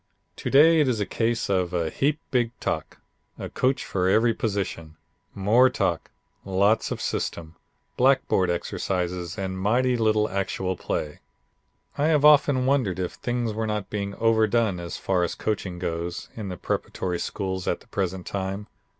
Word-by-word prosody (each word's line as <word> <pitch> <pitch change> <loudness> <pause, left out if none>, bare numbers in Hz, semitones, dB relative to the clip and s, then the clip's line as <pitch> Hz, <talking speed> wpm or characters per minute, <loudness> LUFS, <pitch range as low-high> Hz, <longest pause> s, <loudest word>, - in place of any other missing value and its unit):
"To - - -3
day 160 +4 +6
it 150 - +3
is 120 -4 0
a 105 - 0
case 115 +2 -1
of 90 -2 0
a 85 -2 0
heap 145 +2 0
big 120 -2 0
talk, - - -3 0.4
a - - -6
coach 130 +2 0
for 90 -1 0
every 115 +4 +4
position, 95 -8 -3 0.4
more 115 +6 +4
talk, - - -1 0.3
lots 100 +3 +2
of - - -4
system, 80 -1 -3 0.4
blackboard 125 -8 +3
exercises 90 0 -2
and 95 -1 -3
mighty 125 +6 +2
little 110 -2 +2
actual 95 -1 -2
play. 75 -3 -4 0.8
"I 145 - +3
have 150 -2 +3
often 145 -3 +5
wondered 130 -10 +1
if 90 -1 -2
things 120 -2 -2
were 110 +1 -2
not 105 -2 -3
being 100 -1 -3
overdone 110 -3 +2
as 85 -1 -5
far 90 -2 0
as 85 - -2
coaching 95 -4 -3
goes 85 0 -4
in 105 -4 -5
the 90 - -5
preparatory 90 +3 -3
schools 95 -2 -3
at - - -1
the - - -20
present 95 -2 -3
time. 95 +1 -3
100 Hz, 160 wpm, -25 LUFS, 90-120 Hz, 0.8 s, day